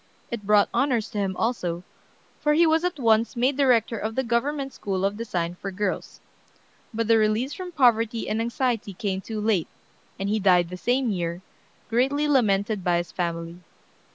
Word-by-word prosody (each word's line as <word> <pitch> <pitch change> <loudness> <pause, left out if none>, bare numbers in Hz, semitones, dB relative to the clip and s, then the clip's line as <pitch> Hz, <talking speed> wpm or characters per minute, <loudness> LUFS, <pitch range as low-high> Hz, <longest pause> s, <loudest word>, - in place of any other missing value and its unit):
It 210 -4 -5
brought 210 -1 +5
honors 250 -6 +1
to 210 - -3
him 190 -2 -1
also, 180 -7 -1 0.6
for 300 -1 +2
he 335 +3 +5
was 320 +1 +3
at 360 -3 -1
once 230 -1 +2
made 255 +3 +1
director 245 -5 +2
of 220 +1 -3
the 265 - +1
government 270 +3 -1
school 195 -4 -2
of 200 +1 0
design 180 -6 -3
for 195 - -3
girls. 195 0 -3 0.7
But 230 -1 -2
the 225 0 +5
release 220 +6 +1
from 365 -1 -7
poverty 230 -5 +2
and 220 +1 -1
anxiety 235 -4 -1
came 190 0 -2
too 220 +1 -5
late, 210 -6 +1 0.5
and 195 - -2
he 215 +2 +1
died 180 -3 +4
the 180 - -6
same 245 +5 0
year, 175 -1 -3 0.4
greatly 270 +6 +1
lamented 210 -7 +2
by 175 -1 +2
his 175 0 -3
family. 170 -1 -4
220 Hz, 180 wpm, -25 LUFS, 195-250 Hz, 0.7 s, brought